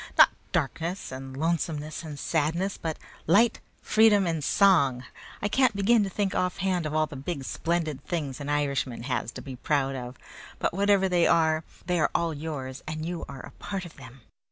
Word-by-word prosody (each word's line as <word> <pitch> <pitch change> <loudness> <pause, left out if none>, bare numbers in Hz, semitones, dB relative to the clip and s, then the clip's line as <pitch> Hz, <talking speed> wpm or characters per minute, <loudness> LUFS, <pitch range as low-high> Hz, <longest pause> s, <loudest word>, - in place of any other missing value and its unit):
"Not - - +9 0.2
darkness, 170 +2 -2
and 130 0 -7
lonesomeness, 155 -1 -1
and 155 -3 -7
sadness, 165 +6 0
but 160 -2 -4 0.3
'light, 215 +8 +4 0.2
freedom, 215 -2 +5
and 165 -3 -1
song.' 140 -8 +4 0.4
I - - +3
can't 250 0 +3
begin 210 +3 +4
to 195 - -2
think 195 0 -1
offhand 180 -2 0
of 155 - -4
all 155 0 +3
the 150 - -10
big, 140 +1 -4
splendid 160 -2 -2
things 145 -7 -3
an 145 0 -5
Irishman 140 -5 -1
has 125 -3 -2
to - - -8
be 130 -2 -7
proud 135 0 0
of; 125 -1 -6 0.4
but - - -1
whatever 200 0 +3
they 175 -2 +3
are, 160 -1 +3 0.2
they 180 -1 +1
are - - +3
all 170 -1 +1
yours, 145 -3 -5
and 155 0 -4
you 175 0 -4
are 135 -2 -7
a - - -11
part 195 -2 -3
of 170 - -12
them. 130 -1 -12
160 Hz, 185 wpm, -27 LUFS, 140-185 Hz, 0.4 s, Not